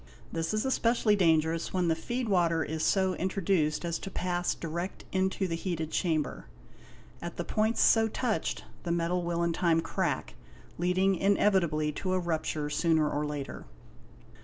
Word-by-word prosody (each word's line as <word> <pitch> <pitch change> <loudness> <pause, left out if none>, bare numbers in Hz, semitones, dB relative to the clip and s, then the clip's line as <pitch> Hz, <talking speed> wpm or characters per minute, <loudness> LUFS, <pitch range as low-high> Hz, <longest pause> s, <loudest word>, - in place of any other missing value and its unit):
This 165 0 -2
is 215 +2 0
especially 230 -4 +2
dangerous 165 -3 +2
when 180 -2 +1
the 165 - +3
feed 240 +9 -3
water 170 -5 +2
is 160 +1 -4
so 190 +1 +2
introduced 175 -4 0
as 170 -1 -2
to" - - -6
pass 175 -1 -1
direct 170 +3 -5
into 190 0 0
the 170 - -3
heated 165 -2 -3
chamber; 160 -4 -1 0.7
at 170 0 -6
the 175 - -2
points 220 +1 +1
so 225 -1 +5
touched 225 0 -2 0.2
the 175 - -5
_ - - +2
metal 170 +1 0
will 170 0 -1
in 170 -1 +1
time 165 -1 +2
crack, 165 - -2 0.5
leading 185 +2 +2
inevitably 185 -6 +2
to 185 +5 -2
a 185 - +2
rupture 160 -3 -2
sooner 155 +1 +2
or 150 0 -1
later. 145 -2 -5
175 Hz, 160 wpm, -29 LUFS, 160-190 Hz, 0.7 s, so